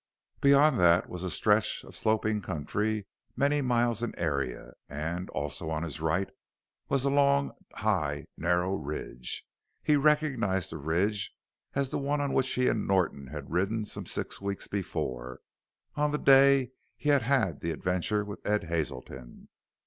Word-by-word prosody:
Beyond 140 Hz, -1 st, +5 dB
that 85 Hz, 0 st, +4 dB
was 90 Hz, -, -6 dB
a 95 Hz, -, -2 dB
stretch 105 Hz, +3 st, +2 dB
of -, -, -13 dB
sloping 110 Hz, -1 st, +1 dB
country 105 Hz, +5 st, -2 dB, 0.3 s
many 145 Hz, +1 st, +2 dB
miles 120 Hz, -3 st, +1 dB
in 120 Hz, -, -3 dB
area, 70 Hz, -7 st, -2 dB, 0.2 s
and, 80 Hz, +6 st, -4 dB
also 75 Hz, +3 st, -3 dB
on 80 Hz, 0 st, -2 dB
his 80 Hz, -1 st, -5 dB
right, 85 Hz, +5 st, +1 dB, 0.6 s
was 135 Hz, -1 st, +1 dB
a 140 Hz, -, +2 dB
long, 140 Hz, 0 st, +3 dB, 0.2 s
high, 75 Hz, -10 st, 0 dB
narrow 90 Hz, +2 st, +1 dB
ridge. 70 Hz, -7 st, -4 dB, 0.4 s
He 150 Hz, -, +4 dB
recognized 140 Hz, -, +2 dB
the -, -, -5 dB
ridge 95 Hz, +7 st, 0 dB, 0.4 s
as 135 Hz, -1 st, 0 dB
the -, -, -1 dB
one 145 Hz, +1 st, 0 dB
on 140 Hz, -1 st, -1 dB
which 130 Hz, 0 st, +2 dB
he 125 Hz, 0 st, +2 dB
and -, -, 0 dB
Norton 90 Hz, -8 st, +1 dB
had 70 Hz, 0 st, -8 dB
ridden 100 Hz, +6 st, 0 dB
some -, -, -6 dB
six -, -, -4 dB
weeks 100 Hz, 0 st, -4 dB
before 65 Hz, -10 st, -4 dB, 0.5 s
on 150 Hz, 0 st, +1 dB
the 150 Hz, -, 0 dB
day 135 Hz, -2 st, +6 dB, 0.3 s
he 150 Hz, -, -2 dB
had 140 Hz, -2 st, +5 dB
had 115 Hz, -, +1 dB
the 85 Hz, -, -3 dB
adventure 90 Hz, +5 st, 0 dB
with 100 Hz, 0 st, -8 dB
Ed 105 Hz, -1 st, +1 dB
Hazelton. 65 Hz, -6 st, -5 dB
100 Hz, 155 wpm, -29 LUFS, 80-130 Hz, 0.6 s, day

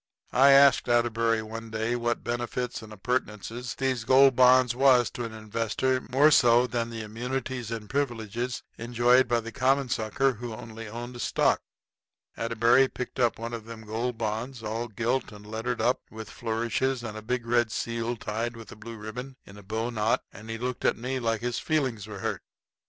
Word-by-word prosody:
I 135 Hz, +3 st, +6 dB
asked 140 Hz, -2 st, +6 dB
Atterbury 115 Hz, -1 st, +2 dB
one 115 Hz, +1 st, -7 dB
day 110 Hz, +2 st, -1 dB
what 120 Hz, 0 st, -1 dB
benefits 120 Hz, +1 st, -3 dB
and 110 Hz, -1 st, -11 dB
appurtenances 120 Hz, +2 st, -3 dB
these 130 Hz, -3 st, -1 dB
Gold 130 Hz, +2 st, +6 dB
Bonds 125 Hz, -1 st, +5 dB
was 125 Hz, -2 st, +5 dB
to 120 Hz, -, -4 dB
an 115 Hz, -, -6 dB
investor 115 Hz, +4 st, -1 dB
more 140 Hz, +4 st, +4 dB
so 120 Hz, -2 st, +6 dB
than 120 Hz, -2 st, -2 dB
the 115 Hz, -1 st, -5 dB
immunities 125 Hz, +2 st, -4 dB
and 115 Hz, -2 st, -5 dB
privileges 120 Hz, -2 st, -2 dB, 0.2 s
enjoyed 120 Hz, +2 st, +3 dB
by 120 Hz, -1 st, +1 dB
the 115 Hz, +1 st, -7 dB
common 135 Hz, +2 st, +1 dB
sucker 130 Hz, +3 st, +1 dB
who 120 Hz, 0 st, -6 dB
only 115 Hz, 0 st, -9 dB
owned 120 Hz, +2 st, -7 dB
stock. -, -, +2 dB, 0.7 s
Atterbury 115 Hz, +3 st, +3 dB
picked 125 Hz, 0 st, -6 dB
up 120 Hz, -2 st, +2 dB
one 115 Hz, +1 st, -5 dB
of 115 Hz, -2 st, -6 dB
them 115 Hz, -1 st, -9 dB
Gold 115 Hz, +3 st, -2 dB
Bonds, 115 Hz, +2 st, -3 dB
all 115 Hz, +2 st, -3 dB
gilt 120 Hz, +4 st, -1 dB
and 105 Hz, 0 st, -12 dB
lettered 110 Hz, +3 st, -3 dB
up 125 Hz, +3 st, +2 dB
with 110 Hz, -1 st, -9 dB
flourishes 120 Hz, +3 st, -1 dB
and 110 Hz, -2 st, -5 dB
a 110 Hz, -, -6 dB
big 120 Hz, +2 st, -2 dB
red 120 Hz, -1 st, +2 dB
seal 115 Hz, +1 st, -2 dB
tied 115 Hz, +3 st, -3 dB
with 115 Hz, -2 st, -11 dB
a -, -, -9 dB
blue 115 Hz, +2 st, -9 dB
ribbon 125 Hz, +5 st, -7 dB
in 100 Hz, -, -13 dB
a 105 Hz, -, -11 dB
bowknot, 110 Hz, +2 st, -1 dB
and 110 Hz, +2 st, -11 dB
he 115 Hz, -, -3 dB
looked 125 Hz, +1 st, -4 dB
at -, -, +2 dB
me 130 Hz, +3 st, -3 dB
like 115 Hz, -3 st, -1 dB
his 120 Hz, 0 st, -2 dB
feelings 130 Hz, -9 st, -1 dB
was 105 Hz, -3 st, -8 dB
hurt. -, -, -2 dB
120 Hz, 185 wpm, -27 LUFS, 110-125 Hz, 0.7 s, I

